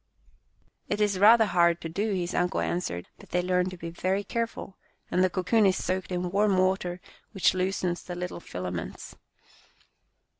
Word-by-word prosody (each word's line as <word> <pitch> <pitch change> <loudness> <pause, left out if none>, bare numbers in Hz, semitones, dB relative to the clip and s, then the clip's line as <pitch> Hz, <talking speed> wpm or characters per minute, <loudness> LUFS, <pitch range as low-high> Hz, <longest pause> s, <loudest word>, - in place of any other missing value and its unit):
" - - -40
It 205 - -1
is 205 -3 +1
rather 220 +3 +7
hard 170 -3 +3
to - - -4
do," 200 +7 -2
his 180 -3 -2
uncle 180 +1 0
an 175 - 0
swered, 90 - -5
" - - -39
but - - -15
they 180 0 0
learn 180 0 +1
to 185 - -9
be 170 0 -6
very 190 +4 -1
careful, 230 -4 -4 0.4
and 180 - +3
the 185 - +3
cocoon 195 +4 +2
is 190 - +2
soaked 185 0 -2
in 180 0 -2
warm 200 0 +3
water 185 -1 +1 0.3
which 195 - +3
loosens 185 -1 -1
the 175 - -7
little 180 0 -5
filaments. 90 - -6
185 Hz, 185 wpm, -27 LUFS, 175-195 Hz, 0.4 s, rather